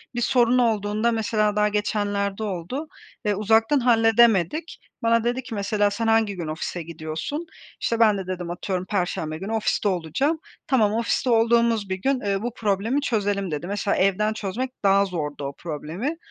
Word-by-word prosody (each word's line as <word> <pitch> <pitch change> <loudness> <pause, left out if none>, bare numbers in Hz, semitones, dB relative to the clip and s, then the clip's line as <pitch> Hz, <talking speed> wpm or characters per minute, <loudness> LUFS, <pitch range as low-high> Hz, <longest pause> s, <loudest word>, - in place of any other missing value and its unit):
Bir 240 - -1
sorun 245 0 +3
olduğunda 215 -1 +1
mesela 215 -2 +1
daha 210 0 +3
geçenlerde 205 -1 -1
oldu 205 - -4 0.4
ve 210 -1 +2
uzaktan 225 +6 +3
halledemedik. 230 - +3 0.2
Bana 230 0 +3
dedi 245 +2 -1
ki 230 -2 -7
mesela, 205 0 +1
"Sen 225 +2 -2
hangi 225 -2 +3
gün 170 -3 -5
ofise 160 +3 -4
gidiyorsun?" 160 - -5 0.4
işte, 230 - 0
ben 215 -3 +5
de 190 -2 -5
dedim 180 -2 -4
atıyorum, 185 +1 -3
"Perşembe 175 -5 -2
günü 195 +6 -6
ofiste 220 -1 0
olacağım." 195 - 0 0.3
"Tamam, 220 -6 +3
ofiste 230 +3 0
olduğumuz 230 -2 +3
bir 190 - 0
gün, 270 +3 +1
eee, 200 -1 -1
bu 240 +1 -3
problemi 220 +5 0
çözelim" 205 - -1
dedi. 150 +3 -4
Mesela 200 0 -1
evden 195 +3 +2
çözmek 220 +5 -3
daha 200 0 +4
zordu 150 -6 -4
o 140 0 -4
problemi 170 - -4
210 Hz, 165 wpm, -24 LUFS, 190-230 Hz, 0.4 s, ben